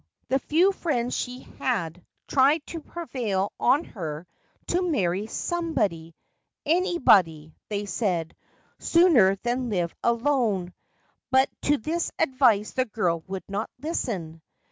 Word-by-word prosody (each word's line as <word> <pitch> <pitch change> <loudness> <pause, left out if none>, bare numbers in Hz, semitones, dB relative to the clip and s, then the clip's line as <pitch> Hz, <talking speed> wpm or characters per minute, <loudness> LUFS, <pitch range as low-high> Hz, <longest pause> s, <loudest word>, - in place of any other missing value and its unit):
The 270 - +2
few 340 +8 +3
friends 255 -10 -1
she 250 +1 -4 0.2
had 180 -9 -2 0.2
tried 285 +3 +3
to 335 - -5
prevail 240 - -3
on 270 +6 +3
her 160 - -6 0.4
to 355 - +2
marry 205 - 0
somebody 215 - -2 0.3
— - - -56
anybody, 205 - +3 0.2
they 205 -1 -2
said, 180 -5 -2 0.4
sooner 300 - +5
than 245 +1 -1
live 175 -5 -1
alone, 235 -7 +1 0.3
— - - -43
but 265 +1 +4
to 295 +1 +3
this 325 +8 -2
advice 255 -8 +3
the 255 -1 0
girl 175 -8 -1
would 190 0 -5
not 200 +2 -3
listen. 195 - -4
235 Hz, 125 wpm, -26 LUFS, 185-290 Hz, 0.4 s, sooner